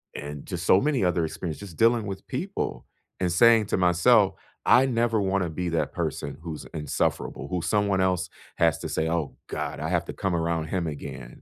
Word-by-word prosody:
and 75 Hz, 0 st, -7 dB
just 85 Hz, -2 st, -4 dB
so 95 Hz, -, +6 dB
many 140 Hz, -6 st, +1 dB
other 90 Hz, -2 st, +2 dB
experiences, 80 Hz, 0 st, -5 dB
just 80 Hz, -, -16 dB
dealing 115 Hz, -1 st, +3 dB
with 95 Hz, 0 st, -6 dB
people, 185 Hz, +10 st, -3 dB, 0.3 s
and 90 Hz, -1 st, 0 dB
saying 115 Hz, +4 st, +6 dB
to -, -, 0 dB
myself, 95 Hz, +3 st, +4 dB, 0.3 s
"I 125 Hz, +2 st, +6 dB
never 115 Hz, -3 st, +1 dB
wanna 95 Hz, -2 st, 0 dB
be 85 Hz, +2 st, -3 dB
that 85 Hz, -1 st, -1 dB
person 70 Hz, -2 st, -3 dB
who's 80 Hz, -2 st, -6 dB
insufferable, 75 Hz, -2 st, -2 dB
who 90 Hz, +2 st, -1 dB
someone 100 Hz, -3 st, +1 dB
else 90 Hz, -1 st, +1 dB, 0.3 s
has 80 Hz, -3 st, +3 dB
to -, -, -5 dB
say, 80 Hz, -, 0 dB
"Oh 80 Hz, -3 st, -2 dB
god, -, -, -4 dB
I 80 Hz, -, -2 dB
have 85 Hz, -1 st, +1 dB
to -, -, -6 dB
come 95 Hz, -3 st, -1 dB
around 85 Hz, -1 st, 0 dB
him 90 Hz, 0 st, -1 dB
again." 65 Hz, -4 st, -7 dB
90 Hz, 195 wpm, -26 LUFS, 80-105 Hz, 0.3 s, so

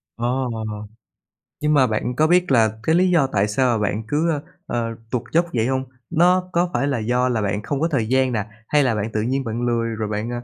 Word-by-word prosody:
Ồ. 125 Hz, +2 st, -1 dB, 1.1 s
Nhưng 150 Hz, 0 st, +2 dB
mà 130 Hz, -3 st, +5 dB
bạn 115 Hz, +3 st, -2 dB
có 155 Hz, +2 st, +3 dB
biết 180 Hz, -2 st, +3 dB
là 115 Hz, -3 st, +5 dB
cái 160 Hz, -, +2 dB
lý 185 Hz, +1 st, +4 dB
do 160 Hz, -6 st, +3 dB
tại 100 Hz, 0 st, +2 dB
sao 120 Hz, +1 st, +1 dB
bạn 105 Hz, +1 st, -1 dB
cứ, 155 Hz, +3 st, +1 dB
ơ, 145 Hz, -2 st, -2 dB, 0.2 s
ờ, 115 Hz, -1 st, -2 dB, 0.2 s
tuột 125 Hz, -2 st, -1 dB
dốc 170 Hz, +1 st, +4 dB
vậy 115 Hz, 0 st, +1 dB
hông? 130 Hz, 0 st, 0 dB, 0.3 s
Nó 180 Hz, +2 st, +3 dB
có 175 Hz, +1 st, +2 dB
phải 140 Hz, -, +1 dB
là 140 Hz, -5 st, 0 dB
do 125 Hz, +3 st, +1 dB
là 115 Hz, -3 st, 0 dB
bạn 105 Hz, +1 st, -2 dB
không 140 Hz, +3 st, -2 dB
có 165 Hz, -, +3 dB
thời 115 Hz, -6 st, 0 dB
gian 130 Hz, 0 st, +2 dB
nè, 105 Hz, -2 st, -1 dB, 0.2 s
hay 150 Hz, -1 st, +3 dB
là 120 Hz, -4 st, +1 dB
bạn 105 Hz, +2 st, -2 dB
tự 105 Hz, -, 0 dB
nhiên 130 Hz, +4 st, -1 dB
bạn 115 Hz, +1 st, -3 dB
lười, 120 Hz, -1 st, 0 dB
rồi 110 Hz, -1 st, -3 dB
bạn 105 Hz, +2 st, -3 dB
125 Hz, 235 wpm, -21 LUFS, 110-145 Hz, 1.1 s, mà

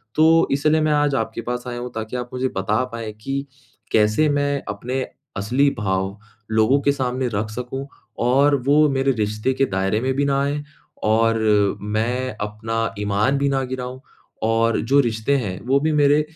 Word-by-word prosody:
तो 160 Hz, +1 st, +5 dB
इसलिए 155 Hz, +3 st, +2 dB
मैं 155 Hz, 0 st, +2 dB
आज 145 Hz, -2 st, +2 dB
आपके 110 Hz, -1 st, -2 dB
पास 125 Hz, +1 st, -4 dB
आया 120 Hz, 0 st, -4 dB
हूँ 125 Hz, 0 st, -6 dB
ताकि 110 Hz, +3 st, -4 dB
आप 125 Hz, 0 st, -5 dB
मुझे 130 Hz, +1 st, 0 dB
बता 105 Hz, +6 st, +1 dB
पाएँ 110 Hz, -2 st, -5 dB
कि 135 Hz, +4 st, -2 dB, 0.5 s
कैसे 105 Hz, +8 st, +3 dB
मैं 145 Hz, -1 st, 0 dB
अपने 125 Hz, +6 st, -3 dB, 0.4 s
असली 125 Hz, +8 st, +2 dB
भाव 95 Hz, 0 st, -1 dB, 0.3 s
लोगों 110 Hz, +6 st, +4 dB
के 140 Hz, -, +3 dB
सामने 130 Hz, -2 st, -1 dB
रख 105 Hz, +1 st, -1 dB
सकूँ 125 Hz, +4 st, -5 dB, 0.4 s
और 140 Hz, +3 st, +4 dB
वो 150 Hz, +2 st, +5 dB
मेरे 135 Hz, 0 st, +1 dB
रिश्ते 110 Hz, +5 st, 0 dB
के 135 Hz, +1 st, +2 dB
दायरे 95 Hz, +2 st, 0 dB
में 130 Hz, +1 st, 0 dB
भी 140 Hz, 0 st, +1 dB
ना 140 Hz, 0 st, +1 dB
आएँ 145 Hz, +1 st, -2 dB, 0.4 s
और 115 Hz, +1 st, +3 dB, 0.4 s
मैं 115 Hz, +4 st, -1 dB
अपना 110 Hz, +2 st, -2 dB
ईमान 105 Hz, +7 st, +1 dB
भी 140 Hz, 0 st, +1 dB
ना 135 Hz, -1 st, 0 dB
गिराऊँ 130 Hz, 0 st, -5 dB, 0.5 s
और 115 Hz, 0 st, +2 dB
जो 140 Hz, +5 st, +3 dB
रिश्ते 120 Hz, +3 st, 0 dB
हैं 100 Hz, -7 st, -3 dB
वो 135 Hz, +1 st, +4 dB
भी 155 Hz, +2 st, +1 dB
मेरे 145 Hz, 0 st, +4 dB
125 Hz, 175 wpm, -22 LUFS, 110-140 Hz, 0.5 s, तो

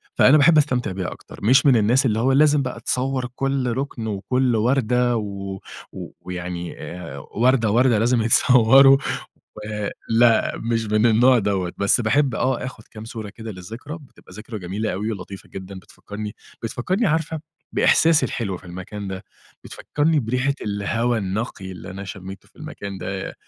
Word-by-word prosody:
فأنا 145 Hz, +4 st, +6 dB
باحب 155 Hz, +2 st, +5 dB
أستمتع 125 Hz, -8 st, +1 dB
بيها 90 Hz, -1 st, -4 dB
أكتر. -, -, -12 dB
مش 130 Hz, +7 st, +5 dB
من 135 Hz, -3 st, +6 dB
الناس 120 Hz, +6 st, +3 dB
اللي 110 Hz, -2 st, +1 dB
هو 130 Hz, +3 st, +2 dB
لازم 145 Hz, +1 st, +4 dB
بقى 125 Hz, -3 st, -4 dB
تصوّر 130 Hz, +2 st, -1 dB
كل 135 Hz, -2 st, -1 dB
رُكن 130 Hz, -5 st, -4 dB
وكل 120 Hz, +4 st, 0 dB
وردة 125 Hz, +1 st, +2 dB
و 100 Hz, -2 st, -5 dB, 0.3 s
و -, -, -8 dB
ويعني 90 Hz, -1 st, -6 dB
آآ 85 Hz, -6 st, -7 dB
وردة، 115 Hz, -, +1 dB
وردة 120 Hz, -1 st, +3 dB
لازم 120 Hz, +1 st, +2 dB
يتصوّروا 125 Hz, +4 st, +6 dB, 0.6 s
و 105 Hz, -, -8 dB, 0.5 s
لأ، 115 Hz, 0 st, +4 dB
مش 115 Hz, -1 st, -1 dB
من 105 Hz, +2 st, +2 dB
النوع 120 Hz, +3 st, +5 dB
دوّة. 95 Hz, -4 st, -1 dB
بس 100 Hz, +4 st, +2 dB
باحب 125 Hz, +3 st, +2 dB
آه، 130 Hz, -1 st, 0 dB
آخُد 125 Hz, -4 st, -8 dB
كام 110 Hz, -1 st, -10 dB
صورة 110 Hz, -2 st, -7 dB
كده 110 Hz, +2 st, -8 dB
للذكرى، 115 Hz, -, -8 dB
بتبقى 135 Hz, -9 st, -18 dB
ذكرى 110 Hz, +1 st, -7 dB
جميلة 100 Hz, +3 st, -3 dB
أوي 105 Hz, +4 st, -2 dB
ولطيفة 100 Hz, -1 st, -9 dB
جدًا 95 Hz, 0 st, -8 dB
بتفكّرني 105 Hz, +3 st, -8 dB, 0.3 s
بتفكرني 185 Hz, -, -1 dB
عارفة 160 Hz, 0 st, -1 dB, 0.3 s
بإحساسي 165 Hz, -1 st, +4 dB
الحلو 100 Hz, -6 st, -3 dB
في -, -, -15 dB
المكان 95 Hz, +3 st, -7 dB
ده، 95 Hz, 0 st, -6 dB, 0.4 s
بتفكّرني 150 Hz, 0 st, 0 dB
بريحة 125 Hz, +4 st, 0 dB
الهوا 110 Hz, +4 st, 0 dB
النقي 95 Hz, -1 st, -4 dB
اللي 90 Hz, +1 st, -9 dB
أنا 95 Hz, +1 st, -7 dB
شمّيته 95 Hz, 0 st, -9 dB
في -, -, -33 dB
المكان 100 Hz, -1 st, -7 dB
ده، 95 Hz, 0 st, -5 dB
115 Hz, 160 wpm, -22 LUFS, 100-130 Hz, 0.6 s, فأنا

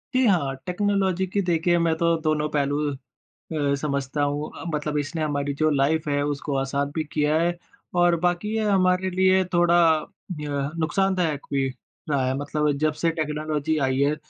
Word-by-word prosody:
जी। 255 Hz, 0 st, +4 dB
हाँ, 160 Hz, -9 st, +2 dB
टेक्नोलॉज़ी 190 Hz, 0 st, 0 dB
की 200 Hz, +2 st, 0 dB
देखिए 175 Hz, 0 st, +2 dB
मैं 165 Hz, -1 st, +2 dB
तो 170 Hz, 0 st, +2 dB
दोनों 155 Hz, -1 st, +1 dB
पहलू 145 Hz, -1 st, 0 dB
अ, -, -, -5 dB, 0.9 s
समझता 140 Hz, 0 st, -2 dB
हूँ 145 Hz, +1 st, -1 dB
अ, -, -, -7 dB
मतलब 150 Hz, 0 st, -1 dB
इसने 155 Hz, +3 st, -3 dB
हमारी 145 Hz, -2 st, -1 dB
जो 155 Hz, 0 st, +4 dB
लाइफ़ 150 Hz, +3 st, +1 dB
है 145 Hz, 0 st, +1 dB
उसको 145 Hz, -1 st, -2 dB
आसान 140 Hz, +1 st, -1 dB
भी 160 Hz, -, -1 dB
किया 150 Hz, +1 st, +2 dB
है 175 Hz, +1 st, +1 dB, 0.4 s
और 175 Hz, -1 st, +4 dB
बाकी 175 Hz, +3 st, 0 dB
ये 220 Hz, -, 0 dB
हमारे 185 Hz, -2 st, +2 dB
लिए 190 Hz, +1 st, +3 dB
थोड़ा 175 Hz, 0 st, +4 dB, 0.6 s
य 140 Hz, -1 st, -2 dB
नुकसानदायक 175 Hz, -2 st, 0 dB
भी 135 Hz, -1 st, +1 dB, 0.4 s
रहा 135 Hz, -3 st, +1 dB
है 130 Hz, -, 0 dB
मतलब 150 Hz, +1 st, 0 dB
जब 155 Hz, +1 st, +1 dB
से 165 Hz, -, +3 dB
टेक्नोलॉज़ी 155 Hz, -1 st, -2 dB
आई 130 Hz, 0 st, 0 dB
है 145 Hz, +2 st, +3 dB
155 Hz, 170 wpm, -24 LUFS, 145-175 Hz, 0.9 s, जी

